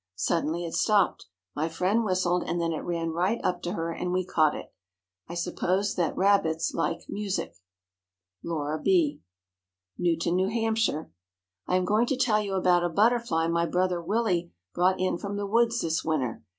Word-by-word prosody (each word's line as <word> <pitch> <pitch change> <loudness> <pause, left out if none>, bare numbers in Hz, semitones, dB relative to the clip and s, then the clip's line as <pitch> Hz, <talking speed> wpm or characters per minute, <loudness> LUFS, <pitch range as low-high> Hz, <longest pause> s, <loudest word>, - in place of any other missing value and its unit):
Suddenly 165 - -1
it 165 - -6
stopped. 205 -3 +2 0.3
My 155 +3 -1
friend 185 +7 +1
whistled, 185 -3 +1
and 175 - -2
then 165 -1 0
it 155 - -3
ran 165 -1 -2
right 185 +8 0
up 180 -1 0
to 175 - -3
her, 165 -4 -2
and 180 +2 -3
we 185 0 0
caught 155 -4 +2
it. - - -9 0.6
I 170 - -6
suppose 185 +3 0
that 175 -4 -1
rabbits 185 -5 +2
like 165 - -2
music. 200 -2 -3 0.9
LAURA 155 -2 -3
B. 340 -6 +2 0.8
NEWTON, 170 0 +1
NEW 185 +1 +2
HAMPSHIRE. 225 -7 0 0.6
I 180 - +1
am 185 0 +2
going 215 +5 +2
to 270 - 0
tell 225 -5 +2
you 200 -2 -3
about 180 -2 +3
a 175 - +1
butterfly 210 -3 +2
my 170 0 +1
brother 180 0 0
Willie 180 -2 0 0.2
brought 185 +1 +2
in 185 -2 0
from 200 0 -4
the 205 - -2
woods 230 +3 +2
this 160 0 -1
winter. 135 -8 -1
180 Hz, 175 wpm, -27 LUFS, 165-205 Hz, 0.9 s, about